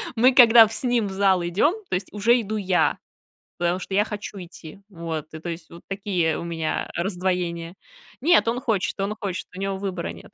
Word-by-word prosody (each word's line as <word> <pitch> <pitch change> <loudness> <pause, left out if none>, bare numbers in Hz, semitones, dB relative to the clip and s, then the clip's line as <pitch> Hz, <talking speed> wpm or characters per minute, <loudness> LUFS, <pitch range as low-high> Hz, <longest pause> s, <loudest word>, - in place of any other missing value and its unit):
мы 250 +3 +5
когда 235 -3 +8
в 215 - -7
с - - -4
ним 240 -4 +1
в - - -6
зал 190 -2 +2
идём, 190 - +2 0.2
то - - 0
есть 185 - -4
уже 230 +4 +3
иду 215 0 -4
я, 185 -5 +1 0.6
потому 175 +1 0
что 190 - -6
я 205 +2 +4
хочу 210 -1 -7
идти. 175 -1 -11
Вот, 165 -5 -5
и - - -5
то 175 - -7
есть 165 -1 -8
вот 170 - -12
такие 190 -5 -1
у - - -5
меня 165 -2 -3
раздвоения. 175 -2 -2 0.5
Нет, 330 -4 +4
он 240 +2 0
хочет, 220 -7 -1
он 200 +2 -1
хочет, 190 -3 -4
у 185 - -7
него 195 0 -2
выбора 190 -3 -4
нет. - - -14
190 Hz, 210 wpm, -24 LUFS, 170-215 Hz, 0.6 s, когда